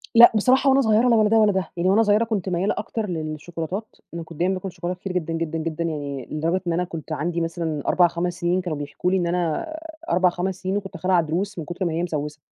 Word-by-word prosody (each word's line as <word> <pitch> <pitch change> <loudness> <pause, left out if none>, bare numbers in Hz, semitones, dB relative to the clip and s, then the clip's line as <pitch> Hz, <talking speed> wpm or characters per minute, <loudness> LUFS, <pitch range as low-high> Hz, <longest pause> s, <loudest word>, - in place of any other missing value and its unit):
لأ 235 +1 +10
بصراحة، 255 +6 +4
وأنا 270 +1 +5
صغيرة 220 +1 +3
لا 235 - +5
ولا 215 -1 +4
ده 225 - +4
ولا 215 -1 +5
ده، 190 -3 -2
يعني 175 +2 +2
وأنا 210 +4 +5
صغيرة 210 +1 +3
كنت 210 -5 -2
ميّالة 185 +4 +1
أكتر 225 -2 -3
للشوكولاتات 165 +5 -5 0.2
أنا 170 -1 -5
كنت 165 -2 -12
دايمًا 180 +2 +2
باكل 185 0 -4
شوكولاتة 175 +1 -5
كتير 190 0 -5
جدًا، 165 -2 -2
جدًا، 165 0 -2
جدًا 165 +1 -3
يعني، 145 -5 -4
لدرجة 165 +5 0
إن 170 - +1
أنا 180 - +1
كنت 165 -3 -7
عندي 170 +3 -1
مثلًا 165 -3 -2
4،5 175 0 +2
سنين 175 +2 +1
كانوا 170 -4 -3
بيحكوا 145 +5 -2
لي 190 - +3
إن 175 - 0
أنا 170 -2 0
آآ 320 +1 -9
4،5 180 +1 +1
سنين 190 +1 -1
وكنت 195 -2 -6
خالعة 180 +1 +3
ضروس 175 +5 -2
من 160 - -5
كتر 175 +4 -3
ما 165 - -1
هي 170 - -1
مسوسة، 150 -3 -3
175 Hz, 240 wpm, -23 LUFS, 165-200 Hz, 0.2 s, لأ